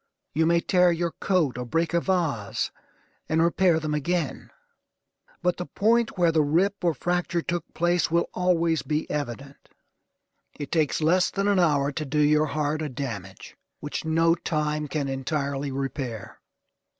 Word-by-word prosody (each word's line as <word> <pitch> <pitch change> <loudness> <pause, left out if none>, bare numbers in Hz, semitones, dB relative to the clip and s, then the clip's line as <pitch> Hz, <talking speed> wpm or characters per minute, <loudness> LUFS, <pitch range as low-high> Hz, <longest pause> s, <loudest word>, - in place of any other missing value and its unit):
You 160 +2 +2
may 170 0 +3
tear 180 -1 +4
your 170 0 -1
coat, 160 -11 0
or 125 - -4
break 165 +6 0
a 170 - +4
vase, 165 - -1 0.6
and 160 - +2
repair 170 -1 +3
them 155 -1 -3
again, 170 +4 -2 0.9
but 180 0 +1
the 180 - -5
point 230 +1 +1
where 175 -2 +4
the 160 -1 +3
rip 180 +7 +1
or 170 -3 +2
fracture 175 +2 -1
took 175 -2 -3
place 175 0 +1
will 170 +1 +1
always 170 -3 +1
be 155 0 -2
evident. 140 -1 -5 0.9
It 145 -2 -6
takes 160 -2 +1
less 180 +4 +3
than 200 0 -1
an 200 -2 +3
hour 145 -5 +2
to 155 - -4
do 150 +1 -3
your 150 +1 +4
heart 150 +1 -1
a 155 - -3
damage 115 -8 -7 0.2
which 145 - -4
no 165 +1 +3
time 150 -2 -2
can 145 -1 -2
entirely 140 +1 -2
repair. 130 -5 -5
160 Hz, 160 wpm, -25 LUFS, 145-175 Hz, 0.9 s, tear